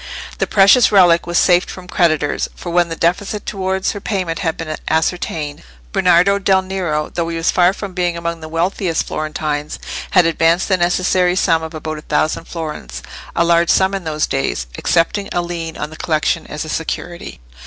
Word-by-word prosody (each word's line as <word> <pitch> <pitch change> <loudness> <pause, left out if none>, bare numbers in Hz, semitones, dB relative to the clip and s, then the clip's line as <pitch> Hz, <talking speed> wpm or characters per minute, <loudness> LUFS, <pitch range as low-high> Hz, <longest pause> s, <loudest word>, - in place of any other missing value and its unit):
The - - +1
precious 200 +5 +5
relic 175 -4 +5
was 175 0 0
safe 180 -1 +4
from 185 -1 -10
creditors, 155 -5 +1
for 175 - -7
when 175 0 +2
the 165 - -4
deficit 195 +5 -1
towards 190 -1 -1
their 205 - -7
payment 185 -6 -2
had 165 -4 -1
been 155 -1 -4
ascertained, 160 -2 -1 0.3
Bernardo 180 - +4
del 190 -1 +2
Nero, 175 -6 -2
though 170 -1 -1
he 165 - -3
was 165 - +1
far 180 0 +4
from 200 -1 -7
being 175 -2 -1
among 170 0 -3
the 160 -1 -9
wealthiest 170 +1 -1
Florentines, 155 -1 -3 0.3
had 180 -3 +4
advanced 165 +3 +2
the 190 - +3
necessary 180 0 +2
sum 165 -3 +2
of 160 0 -7
about 155 0 -5
a - - -11
thousand 155 +2 -1
florins—a 160 - -5
large 170 0 +3
sum 190 +1 +3
in 195 -2 -3
those 155 -2 -1
days—accepting 135 - -1
a 175 - +1
lien 170 -2 -5
on 150 - -5
the 160 - -10
collection 155 -2 0
as 150 +1 -5
a - - -8
security. 170 +2 -5
170 Hz, 180 wpm, -18 LUFS, 160-185 Hz, 0.3 s, precious